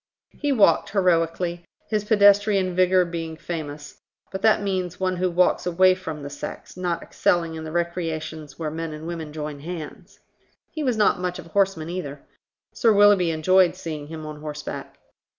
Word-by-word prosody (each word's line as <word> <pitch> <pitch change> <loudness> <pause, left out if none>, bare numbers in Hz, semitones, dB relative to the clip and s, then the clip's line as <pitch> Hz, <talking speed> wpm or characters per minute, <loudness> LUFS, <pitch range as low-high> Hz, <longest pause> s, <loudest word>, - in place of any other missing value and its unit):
He 290 -1 0
walked 200 -10 +4
heroically, 175 -2 +1 0.2
his 215 -2 -1
pedestrian 205 -3 +4
vigour 185 0 +4
being 165 -2 -5
famous, 150 -4 -7 0.3
but 190 - -5
that 215 -1 +4
means 185 -3 -2
one 185 -1 0
who 185 +1 +1
walks 180 +1 +2
away 185 +2 +5
from 160 -5 -6
the 140 - -5
sex, 145 - -8
not 175 -2 -2
excelling 170 -2 0
in 160 0 -6
the 155 - -6
recreations 160 -3 -3
where 155 -2 -3
men 165 0 -4
and 155 +1 -8
women 165 -3 -5
join 150 -1 -6
hands. 160 0 -8 0.5
He 310 - -5
was 250 -5 0
not 210 -4 +3
much 180 -1 -2
of - - -9
a - - -15
horseman 190 -3 0
either. 145 -6 -5 0.5
Sir 230 - +3
Willoughby 205 -4 +5
enjoyed 180 +3 +3
seeing 155 -3 -6
him 160 0 -7
on 150 -1 -8
horseback. 150 -1 -7
175 Hz, 170 wpm, -24 LUFS, 160-185 Hz, 0.5 s, away